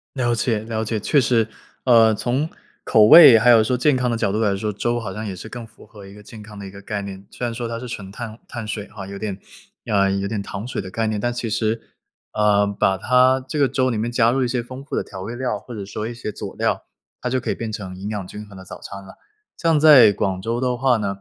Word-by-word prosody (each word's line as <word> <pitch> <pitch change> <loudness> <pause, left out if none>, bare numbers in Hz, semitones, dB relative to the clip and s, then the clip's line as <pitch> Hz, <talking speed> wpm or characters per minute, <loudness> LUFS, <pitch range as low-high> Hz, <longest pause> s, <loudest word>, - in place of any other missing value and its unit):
了 120 -3 0
解， 115 -1 0
了 110 0 -4
解， 110 0 -2
确 145 +8 +2
实。 115 -3 +2 0.4
呃， 115 -3 +5
从 130 +8 -1 0.4
口 110 - +5
味 135 -4 +10
还 115 +3 +3
有 115 -2 +7
说 125 +3 0
健 140 +2 +2
康 125 -1 0
的 120 - 0
角 105 -3 0
度 105 - -1
来 105 -3 +1
说， 105 +2 -3
粥 120 +4 -2
好 100 -4 -6
像 110 +2 -5
也 95 - -5
是 110 - -9
更 120 -1 -8
符 110 - -18
合 105 -3 -14
一 100 - -13
个 105 0 -14
健 110 +1 -12
康 105 0 -12
的 100 - -8
一 95 - -9
个 100 0 -12
概 100 0 -4
念。 100 -1 -9
虽 - - -9
然 120 - -3
说 120 0 -4
它 115 0 -4
是 125 +1 -8
纯 100 -4 -7
碳 110 +2 -8
碳 120 -2 -6
水 105 -1 -5
哈， 100 -2 -9
有 100 +1 -8
点 105 -3 -4 0.5
呃， 100 -2 +2
有 100 0 -1
点 105 0 -3
糖 100 +1 -7
水 125 - -4
的 95 - -8
概 110 +4 -2
念。 110 -1 -2
但 120 +3 -1
其 120 -1 -4
实， 110 +1 -1 0.5
呃， 105 -1 +3
把 100 -1 0
它 125 +4 +3
这 150 - -2
个 140 - +4
粥 130 0 0
里 115 - -2
面 110 +2 -1
加 120 -1 +3
入 130 0 +1
一 - - 0
些 120 0 -2
丰 130 +2 -9
富 - - -5
的 - - 0
调 95 - -10
味 115 +4 -6
料， 125 -4 -2
或 120 +3 -10
者 105 - -5
说 105 +2 -5
一 120 - -6
些 115 -2 -6
佐 - - -8
料， - - -1 0.3
它 125 - -3
就 130 0 -1
可 - - -5
以 - - -2
变 115 - -5
成 105 -4 -6
营 95 +2 -7
养 105 -3 -4
均 105 +2 -9
衡 100 - -14
的 95 - -10
早 - - -10
餐 100 0 -9
了。 95 - -14 0.4
像 165 -2 +2
在 145 -8 +7
广 95 -2 -2
州 115 +4 -2
的 125 -1 0
话 130 0 +3
呢， 105 -2 -2
110 Hz, 300 characters per minute, -21 LUFS, 100-120 Hz, 0.5 s, 味